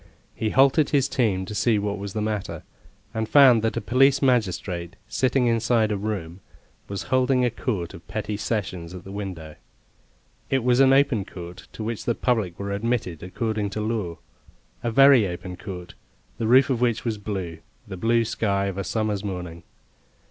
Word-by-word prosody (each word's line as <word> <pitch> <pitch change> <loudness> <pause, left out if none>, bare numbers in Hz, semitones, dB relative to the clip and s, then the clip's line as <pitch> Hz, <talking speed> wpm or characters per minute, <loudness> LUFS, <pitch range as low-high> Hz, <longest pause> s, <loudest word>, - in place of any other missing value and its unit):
He 110 -1 -2
halted 135 +5 +4
his 140 -3 +2
team 100 -7 0
to 105 - -7
see 110 +1 +2
what 100 0 -2
was 100 -1 -6
the 110 - -2
matter, 105 -2 -3 0.5
and 110 0 -2
found 130 -6 +7
that 110 +1 -1
a - - -1
police 135 +5 +4
magistrate, 95 -8 0
sitting 130 0 +1
inside 115 -1 +2
a - - +1
room, 95 -4 -4 0.5
was 100 -1 -4
holding 130 0 +3
a 120 - +1
Court 95 -10 -3
of 85 - -13
Petty 105 -1 -3
Sessions 95 -5 -3
at 90 - -9
the 95 - -10
window. 90 -6 -6 0.9
It 135 -3 +1
was 125 0 +3
an 135 -1 +6
open 135 -6 +3
court, 90 -2 -10
to 110 - -6
which 115 0 -4
the 120 - +1
public 110 -9 0
were 100 0 -4
admitted 100 -5 -2
according 105 +3 -2
to - - -1
law; 105 -6 -2 0.7
a 120 - 0
very 135 -2 +6
open 90 +1 -6
court, 90 -1 -8 0.5
the 115 - 0
roof 130 +4 +5
of 125 -2 -1
which 120 -1 +1
was 110 -3 -2
blue 95 -6 -5 0.3
the - - -6
blue 115 +4 +2
sky 100 -3 0
of 100 -1 -3
a - - -1
summer's 105 -2 -1
morning. 90 -4 -5
110 Hz, 180 wpm, -24 LUFS, 95-120 Hz, 0.9 s, found